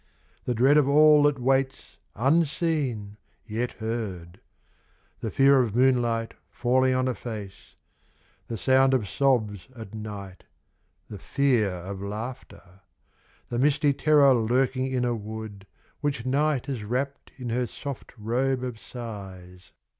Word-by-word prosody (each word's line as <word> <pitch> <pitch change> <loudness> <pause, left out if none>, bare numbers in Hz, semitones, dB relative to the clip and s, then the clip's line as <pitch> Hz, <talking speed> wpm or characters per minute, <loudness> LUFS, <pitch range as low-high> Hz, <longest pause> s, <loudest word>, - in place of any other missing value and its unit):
The 125 - -1
dread 135 +6 +5
of 145 -2 +3
all 150 +1 +6
that 145 -1 +3
waits 135 +1 -1 0.2
unseen, 140 - 0 0.3
yet 115 +2 -3
heard: 100 -6 -5 0.8
The 110 - -3
fear 135 +4 +5
of 115 -4 -2
moonlight 120 -3 +2 0.2
falling 130 +1 +2
on 130 0 +1
a 130 - 0
face: 105 -6 -8 0.7
The 115 - -4
sound 130 +5 +4
of 110 -6 -1
sobs 110 -7 0
at 110 -3 -10
night, 100 -4 -8 0.6
the 105 - -9
fear 125 -2 +1
of 95 +2 -6
laughter: 100 -3 -8 0.7
The 120 - -2
misty 145 +1 +3
terror 145 -2 +5
lurking 130 +3 +1
in 130 -2 -1
a 120 - +1
wood 110 -2 -7 0.3
Which 140 -5 -2
night 140 0 +1
has 130 -6 -4
wrapped 130 +6 -3
in 125 -2 -5
her 125 +1 0
soft 140 +3 -7
robe 125 +4 -1
of 125 -3 -5
sighs. 95 -7 -9
125 Hz, 130 wpm, -26 LUFS, 105-135 Hz, 0.8 s, all